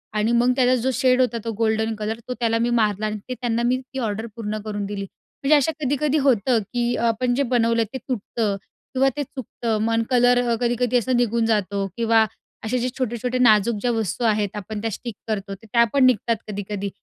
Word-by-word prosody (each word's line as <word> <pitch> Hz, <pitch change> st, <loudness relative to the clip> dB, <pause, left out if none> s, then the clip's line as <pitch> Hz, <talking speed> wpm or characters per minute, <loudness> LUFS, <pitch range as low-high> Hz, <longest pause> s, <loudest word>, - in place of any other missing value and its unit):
आणि 215 Hz, +2 st, +1 dB
मग 240 Hz, +1 st, +3 dB
त्याचा 255 Hz, -1 st, +4 dB
जो 265 Hz, -, +1 dB
शेड 255 Hz, 0 st, +3 dB
होता, 240 Hz, -2 st, +1 dB
तो 230 Hz, -, -1 dB
गोल्डन 220 Hz, 0 st, +1 dB
कलर 215 Hz, +2 st, -4 dB
तो 250 Hz, -, -2 dB
त्याला 230 Hz, -1 st, +1 dB
मी 235 Hz, +1 st, +1 dB
मारला 210 Hz, 0 st, 0 dB
आणि 215 Hz, 0 st, -2 dB
ते 255 Hz, -, -1 dB
त्यांना 235 Hz, -1 st, 0 dB
मी 250 Hz, +1 st, +2 dB, 0.2 s
ती 265 Hz, -, -3 dB
ऑर्डर 220 Hz, -1 st, -2 dB
पूर्ण 215 Hz, -2 st, -3 dB
करून 205 Hz, -1 st, -3 dB
दिली. 200 Hz, 0 st, -4 dB
म्हणजे 275 Hz, +9 st, -1 dB
असं 290 Hz, +2 st, +3 dB
कधी-कधी 290 Hz, +2 st, +1 dB
होतं 250 Hz, -4 st, +3 dB
की 240 Hz, 0 st, 0 dB
अ, -, -, -2 dB
आपण 245 Hz, +2 st, +1 dB
जे 280 Hz, -, +2 dB
बनवलं 230 Hz, -1 st, +3 dB
ते -, -, -2 dB
तुटतं 225 Hz, -4 st, -2 dB, 0.4 s
किंवा 270 Hz, +1 st, +3 dB
ते 290 Hz, -, 0 dB
चुकतं. 235 Hz, -4 st, -4 dB
मग 230 Hz, +1 st, +1 dB
कलर 245 Hz, 0 st, +4 dB, 0.2 s
कधी-कधी 245 Hz, +1 st, +1 dB
असा 250 Hz, +2 st, -1 dB
निघून 235 Hz, -1 st, +1 dB
जातो 200 Hz, -2 st, 0 dB
किंवा 225 Hz, -1 st, +4 dB, 0.4 s
असे 240 Hz, +3 st, 0 dB
जे 250 Hz, +1 st, -1 dB
छोटे-छोटे 250 Hz, 0 st, -2 dB
नाजूक 220 Hz, -2 st, +4 dB
ज्या 245 Hz, -, +1 dB
वस्तू 225 Hz, 0 st, -2 dB
आहेत 210 Hz, -2 st, +1 dB
आपण 210 Hz, +1 st, -5 dB
त्या 225 Hz, -, -2 dB
स्टिक 230 Hz, +1 st, -6 dB
करतो, 200 Hz, -2 st, -3 dB
तर 210 Hz, -, -18 dB
त्या 235 Hz, 0 st, +6 dB
पण 270 Hz, -2 st, +5 dB
निघतात 235 Hz, -1 st, +3 dB
कधी-कधी. 200 Hz, -1 st, -4 dB
230 Hz, 210 wpm, -23 LUFS, 215-250 Hz, 0.4 s, त्या